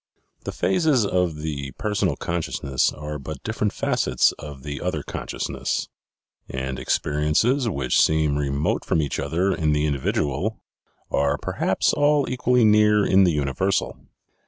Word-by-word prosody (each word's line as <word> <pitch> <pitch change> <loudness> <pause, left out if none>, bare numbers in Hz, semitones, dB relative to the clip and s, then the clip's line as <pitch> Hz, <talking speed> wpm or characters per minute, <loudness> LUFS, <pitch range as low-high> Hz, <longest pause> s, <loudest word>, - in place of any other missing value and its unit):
The - - -3
phases 155 - +2
of 90 -5 -1
the 70 -3 -4
personal 105 -1 -1
consciousness 80 -5 -1
are 75 +1 -6
but 70 +1 -8
different 105 -2 -1
facets - - +1
of 70 -3 -9
the 70 -1 -5
other 80 -5 -2
consciousness; - - -3 0.6
and 65 0 -4
experiences 75 - +1
which 70 - +1
seem 80 -2 +2
remote 70 0 -1
from - - 0
each 75 -2 -1
other 95 +4 0
in 75 -3 +1
the 75 0 +1
in 75 - +1
dividual 75 +8 -1 0.5
are 70 +1 +1
perhaps - - 0
all 145 -1 +3
equally 125 -1 +2
near 105 -1 +4
in 95 0 +5
the 90 - +3
universal. 75 +6 0
80 Hz, 140 wpm, -23 LUFS, 70-105 Hz, 0.6 s, in